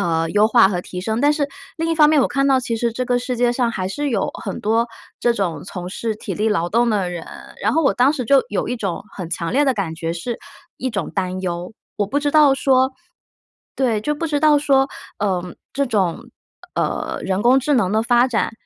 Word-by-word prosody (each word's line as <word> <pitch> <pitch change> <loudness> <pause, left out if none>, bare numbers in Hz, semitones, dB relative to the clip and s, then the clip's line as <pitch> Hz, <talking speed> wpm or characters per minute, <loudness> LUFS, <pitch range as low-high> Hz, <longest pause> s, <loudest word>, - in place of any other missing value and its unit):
呃， 165 -1 0
优 210 +1 +4
化 235 -3 +6
和 180 -3 -2
提 180 0 -7
升。 220 +2 -1
但 290 +2 +4
是 290 -2 0 0.3
另 330 0 -1
一 - - +2
方 300 -2 +6
面， 310 -1 +4
我 - - +3
看 275 0 +1
到 265 -1 +4
其 240 -2 -2
实 235 +1 0
这 255 +2 -2
个 245 0 +1
世 250 0 -3
界 240 0 +2
上 245 -1 +1
还 185 -5 -3
是 290 +8 -2
有 215 -6 0
很 - - -4
多 225 +3 +1 0.3
这 240 -1 +2
种 185 -6 -2
从 180 -1 -7
事 220 +1 -3
体 - - -6
力 215 +1 0
劳 175 -5 0
动 235 +2 +3
的 195 -5 0
人， 170 -2 -6 0.3
然 - - +1
后 325 - +3
我 275 - +3
当 255 +3 +4
时 260 -5 -3
就 275 +2 +5
有 205 - -2
一 245 - -2
种 200 -4 -4
很 180 -4 -6
强 170 +1 -3
烈 285 +3 +3
的 265 - +3
感 185 -6 -3
觉， 165 0 -4
是 230 +8 -4 0.4
一 260 - -2
种 245 - -3
担 185 -1 -2
忧， 175 +3 -4 0.2
我 205 - 0
不 285 +8 0
知 290 0 0
道 295 -3 +6
说 260 -1 +2 0.8
对， 240 -5 +1
就 295 +8 -1
不 330 +3 -3
知 295 -2 -1
道 305 -1 +5
说， 270 -2 +3 0.3
呃， 185 -3 -2 0.2
这 280 0 0
种， 190 -7 0 0.5
呃， - - -2
人 190 +1 -1
工 255 +3 +5
智 290 +3 0
能 195 -7 +2
的 220 +1 +2
发 240 +2 +3
展 230 -1 0
235 Hz, 255 characters per minute, -20 LUFS, 190-270 Hz, 0.8 s, 化